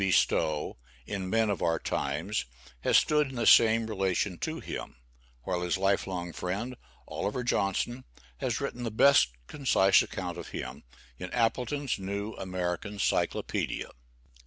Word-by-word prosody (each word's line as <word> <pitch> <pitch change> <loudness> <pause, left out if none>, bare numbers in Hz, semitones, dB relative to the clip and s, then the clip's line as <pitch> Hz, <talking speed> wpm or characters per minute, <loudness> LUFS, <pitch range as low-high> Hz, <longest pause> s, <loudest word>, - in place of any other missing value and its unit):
B. 95 - +2
Stowe, 80 -4 +2 0.3
in 95 +1 -4
"Men 110 0 +2
of 95 - -3
Our 80 -1 +2
Times," 80 +11 -2 0.3
has - - +4
stood 150 -2 +3
in 135 - -9
the 120 -2 -1
same 115 0 +6
relation 95 -3 -1
to 160 +1 -3
him, - - -6 0.5
while 90 +2 -1
his 90 +1 0
life 95 +1 +1
long 90 -2 -4
friend, 100 +10 -3 0.3
Oliver 125 +5 -2
Johnson, 120 +4 0 0.3
has 125 -4 -1
writen 140 -3 -4
the 120 - -1
best 125 - +6 0.2
concise 100 - +4
account - - -4
of - - -7
him, 65 0 -6 0.4
in 90 - -5
"Appleton's 125 +3 0
New 100 +3 -3
American 90 +2 -3
Cyclopædia." - - -1
100 Hz, 145 wpm, -29 LUFS, 90-120 Hz, 0.5 s, same